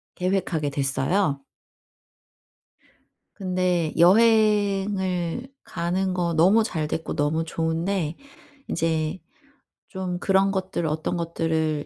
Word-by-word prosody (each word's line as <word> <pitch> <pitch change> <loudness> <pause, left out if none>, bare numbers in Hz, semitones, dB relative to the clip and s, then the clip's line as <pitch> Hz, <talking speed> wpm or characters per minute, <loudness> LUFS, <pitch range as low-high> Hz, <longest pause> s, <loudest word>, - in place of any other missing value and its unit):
계획하게 180 -5 -1
됐어요. 140 +3 0 1.9
근데 180 -4 -1
여행을 200 0 +3 0.2
가는 185 +2 -2
거 175 -2 -1
너무 190 +8 +5
잘 160 -8 -2
됐고 160 +2 -4
너무 150 +3 0
좋은데 165 +1 -2 0.5
인제 160 +1 -1 0.7
좀 185 -2 -4
그런 195 +1 +2
것들 190 -3 -2
어떤 155 +3 -2
것들을 160 -2 -1
175 Hz, 185 characters per minute, -24 LUFS, 160-190 Hz, 1.9 s, 너무